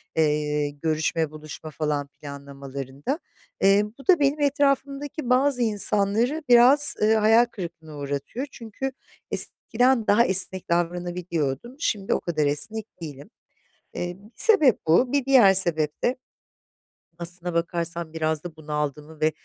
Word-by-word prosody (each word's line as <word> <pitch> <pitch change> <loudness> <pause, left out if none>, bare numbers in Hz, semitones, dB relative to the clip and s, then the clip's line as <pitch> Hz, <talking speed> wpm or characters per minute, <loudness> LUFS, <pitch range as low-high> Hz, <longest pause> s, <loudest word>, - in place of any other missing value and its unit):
eee, 150 -1 0
görüşme, 155 +1 -2
buluşma 155 0 -10
falan 150 -2 -2
planlamalarında. 140 - -7 0.4
Eee, 195 +1 +4 0.2
bu 275 - -14
da 365 -4 +5
benim 285 +1 +1
etrafımdaki 280 0 -1
bazı 255 0 +2
insanları 220 +6 +1
biraz, 250 +5 +7
ııı, 215 +1 +4
hayal 220 +2 +4
kırıklığına 170 -8 -9
uğratıyor. 145 - -5
Çünkü 235 +4 -6 0.4
eskiden 245 -1 +2
daha 210 +4 +4
esnek 190 -1 +1
davranabiliyordum, 175 - -2
şimdi 205 -10 -1
o - - 0
kadar 155 -4 -1
esnek 220 +9 -3 0.2
değilim. 145 0 -9 0.6
Eee, 175 +1 -5
1 210 +4 -18
sebep 315 - +6
bu, 210 +11 +3
bir 280 -3 +1
diğer 250 -8 +6
sebep 160 -5 -1
de 245 - +1 1.0
aslına 175 +1 -6
bakarsan 170 -1 -3
biraz 155 -1 -2
da 175 -3 -8
bunaldığımı 150 0 -5
ve 155 0 +3
175 Hz, 125 wpm, -24 LUFS, 155-240 Hz, 1.0 s, biraz